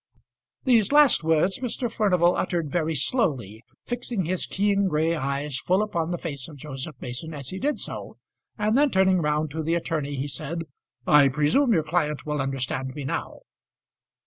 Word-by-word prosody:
These 230 Hz, -5 st, +3 dB
last 290 Hz, -, +5 dB
words 160 Hz, +4 st, +2 dB
Mr. 250 Hz, 0 st, -2 dB
Furnival 180 Hz, -6 st, +3 dB
uttered 170 Hz, -5 st, -1 dB
very 160 Hz, -1 st, 0 dB
slowly, 130 Hz, -, 0 dB, 0.2 s
fixing 240 Hz, -5 st, -2 dB
his 180 Hz, +2 st, 0 dB
keen 200 Hz, 0 st, +1 dB
grey 160 Hz, 0 st, +1 dB
eyes 140 Hz, -2 st, -2 dB
full 185 Hz, +8 st, +2 dB
upon 170 Hz, -6 st, -2 dB
the 175 Hz, -, -2 dB
face 140 Hz, -6 st, -5 dB
of 155 Hz, -3 st, -11 dB
Joseph 145 Hz, +1 st, -6 dB
Mason 155 Hz, +6 st, -5 dB
as 140 Hz, -3 st, -6 dB
he 190 Hz, -, -5 dB
did 290 Hz, +3 st, 0 dB
so, -, -, -6 dB, 0.4 s
and 215 Hz, +1 st, +1 dB
then 290 Hz, +2 st, +4 dB
turning 190 Hz, -4 st, +3 dB
round 150 Hz, 0 st, 0 dB
to 160 Hz, +2 st, -3 dB
the 165 Hz, +2 st, 0 dB
attorney 155 Hz, -4 st, -2 dB
he 135 Hz, +2 st, -3 dB
said, 150 Hz, +5 st, -4 dB, 0.4 s
"I 145 Hz, -2 st, +6 dB
presume 150 Hz, -, +2 dB
your 165 Hz, -8 st, +3 dB
client 150 Hz, -2 st, -1 dB
will 150 Hz, -2 st, -1 dB
understand 130 Hz, -1 st, -3 dB
me 145 Hz, -, -5 dB
now." 135 Hz, -, -4 dB
160 Hz, 170 wpm, -25 LUFS, 145-190 Hz, 0.4 s, I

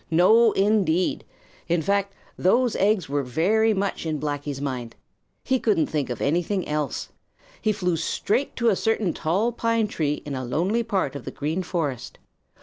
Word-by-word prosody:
No, 215 Hz, +8 st, +5 dB
indeed! 195 Hz, -4 st, +1 dB, 0.4 s
In 170 Hz, -1 st, +1 dB
fact, 200 Hz, +1 st, 0 dB, 0.2 s
those 240 Hz, +6 st, +2 dB
eggs 200 Hz, -4 st, +2 dB
were 145 Hz, +1 st, 0 dB
very 190 Hz, -, +2 dB
much 200 Hz, -1 st, -1 dB
in 155 Hz, -2 st, -2 dB
Blacky's 145 Hz, -1 st, -3 dB
mind. 125 Hz, -5 st, -4 dB, 0.5 s
He 260 Hz, -1 st, +1 dB
couldn't 205 Hz, -10 st, +2 dB
think 145 Hz, -4 st, -2 dB
of 120 Hz, -, -4 dB
anything 175 Hz, +6 st, 0 dB
else. 150 Hz, -1 st, -2 dB, 0.5 s
He 215 Hz, -, +2 dB
flew 180 Hz, -4 st, 0 dB
straight 205 Hz, -, -1 dB
to 235 Hz, -1 st, +2 dB
a 205 Hz, -, +3 dB
certain 220 Hz, -4 st, 0 dB
tall 195 Hz, +9 st, 0 dB
pine 230 Hz, -1 st, +1 dB
tree 150 Hz, -6 st, -2 dB
in 145 Hz, -, -5 dB
a 130 Hz, -1 st, -3 dB
lonely 175 Hz, -, 0 dB
part 195 Hz, -, -1 dB
of 140 Hz, -, -6 dB
the -, -, -5 dB
Green 155 Hz, +5 st, -2 dB
Forest. 160 Hz, -8 st, -3 dB
180 Hz, 165 wpm, -24 LUFS, 150-215 Hz, 0.5 s, No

